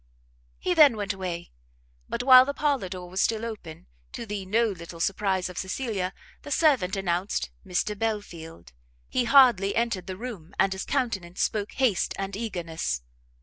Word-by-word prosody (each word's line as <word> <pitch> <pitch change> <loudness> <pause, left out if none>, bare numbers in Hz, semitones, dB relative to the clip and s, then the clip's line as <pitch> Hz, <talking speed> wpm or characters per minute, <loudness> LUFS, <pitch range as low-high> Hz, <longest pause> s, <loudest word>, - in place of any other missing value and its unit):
He 365 - 0
then 295 -9 +6
went 205 0 -2
away: 180 -3 -5 0.6
but 235 - -2
while 255 -1 +9
the 280 +2 -4
parlour 280 -10 0
door 180 -1 -7
was 185 +2 -2
still 225 0 +1
open, 190 - -8 0.3
to - - -6
the 205 -3 -5
no 225 +4 +3
little 170 -3 -8
surprise 190 0 0
of 180 - -6
Cecilia, 190 -2 -2 0.3
the - - -10
servant 270 - +3
announced 180 - -1
Mr 195 +4 -1
Belfield. 170 - -5 0.4
He 250 - 0
hardly 235 -7 +5
entered 230 -6 -1
the 185 -1 -5
room, 200 -7 -8
and 195 - +3
his 190 - -5
countenance 205 -10 -1
spoke 210 -1 -2
haste 250 -8 +1
and 195 0 -4
eagerness. 165 - -3
195 Hz, 160 wpm, -26 LUFS, 180-235 Hz, 0.6 s, while